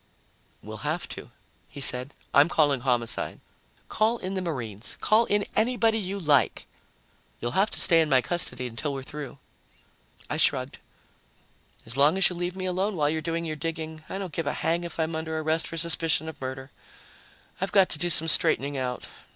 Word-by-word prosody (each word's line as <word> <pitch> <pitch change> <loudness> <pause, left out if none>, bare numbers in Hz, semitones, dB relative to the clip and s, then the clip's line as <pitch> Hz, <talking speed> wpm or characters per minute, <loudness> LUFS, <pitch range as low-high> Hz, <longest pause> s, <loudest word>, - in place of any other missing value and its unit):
"We'll - - -8
have - - -3
to," - - -8 0.4
he - - -10
said. 130 0 +3 0.2
"I'm 145 +4 +6
calling 145 -5 +2
Homicide." 120 -3 -1 0.5
"Call 220 +2 +1
in 190 -3 -5
the 190 - -2
Marines. 120 - -5
Call 220 +2 +3
in 205 -1 +1
anybody 225 -1 +2
you 200 0 -4
like." 150 -6 +2 0.7
"You'll 120 - -2
have 195 - +2
to - - -4
stay 165 -2 +5
in 155 - 0
my 130 -2 +5
custody 130 -1 0
until 125 +5 -4
we're 135 - -5
through." 140 -1 -8 0.9
I - - -3
shrugged. - - +1 1.1
"As 120 - -5
long 150 +6 +4
as 195 - +6
you - - -5
leave 175 +1 -3
me 185 -1 -4
alone 190 +3 -1
while 150 -2 +1
you're 160 0 -2
doing 165 +1 -3
your 155 -1 -3
digging, 160 0 -5
I - - -4
don't 190 -5 -6
give 165 - -3
a - - 0
hang 170 +2 -1
if 170 -1 -8
I'm 160 0 -1
under 160 0 -3
arrest 160 +1 -1
for 165 - -6
suspicion 165 -1 +1
of 160 - -9
murder. 130 +1 -6 0.9
I've 195 - -1
got 195 -2 +4
to 150 - -3
do 175 +2 +1
some 165 -1 +6
straightening 140 -2 +3
out. 125 -1 -4
160 Hz, 190 wpm, -26 LUFS, 140-180 Hz, 1.1 s, I'm